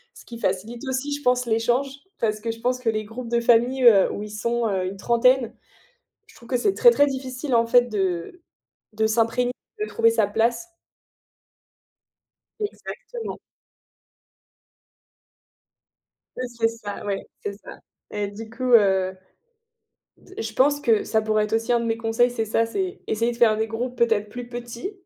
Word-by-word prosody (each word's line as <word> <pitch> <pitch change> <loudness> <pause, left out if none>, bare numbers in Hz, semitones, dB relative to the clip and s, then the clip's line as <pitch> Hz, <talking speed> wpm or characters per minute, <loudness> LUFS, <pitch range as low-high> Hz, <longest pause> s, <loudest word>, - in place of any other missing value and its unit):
Ce - - -15
qui 235 -1 -9
facilite 215 +6 -2
aussi, 265 +2 -2
je 290 - -4
pense, 250 -1 +2
l'échange 240 +4 +1 0.3
parce 215 -1 0
que 230 - -4
je 225 0 -4
pense 250 +1 0
que 245 -3 0
les 215 -1 -1
groupes 230 +3 -7
de 235 0 +2
famille, 240 +3 +3
heu, 215 -6 +7
où 205 - -5
ils 210 - -8
sont, 235 +2 -1
heu, 190 -3 -1
une 195 +1 -6
trentaine, 235 +2 +3 0.7
je 450 - -20
trouve 235 - -16
que 255 - +1
c'est 320 +11 +1
très, 485 - +7
très 290 -11 +4
difficile, 260 0 -3
en 230 0 +4
fait, 245 +1 +6
de 195 - -3 0.5
de 220 +1 +1
s'imprégner, 230 +3 +1 0.3
de 425 - -1
trouver 230 - +3
sa 225 -2 +2
place. 230 - 0 1.9
Exactement. 450 +2 -6 3.0
Oui, 255 - -3
c'est 235 -1 +1
ça, 225 -3 -7
ouais, 200 -1 -3 0.2
c'est 205 - -3
ça. 200 - -12 0.3
Et 205 -1 -2
du 215 +3 -9
coup, 250 +2 -1
heu, 190 -4 +4 1.0
d 380 - -10
je 220 0 -5
pense 285 +4 +3
que 225 -5 +3
ça 220 - +1
pourrait 215 0 +1
être 215 - -6
aussi 225 +2 0
un 240 - +3
de 235 - -3
mes 225 0 0
conseils, 230 +2 +2
c'est 225 -2 -2
ça, 225 +1 +1
c'est 370 - -4
essayer 230 +2 0
de 235 - -8
faire 220 -3 +4
des 220 0 0
groupes, 240 +2 -4
peut-être, 220 -3 +2
plus 245 +2 -8
petits, 240 - -6
230 Hz, 175 wpm, -24 LUFS, 220-250 Hz, 3.0 s, heu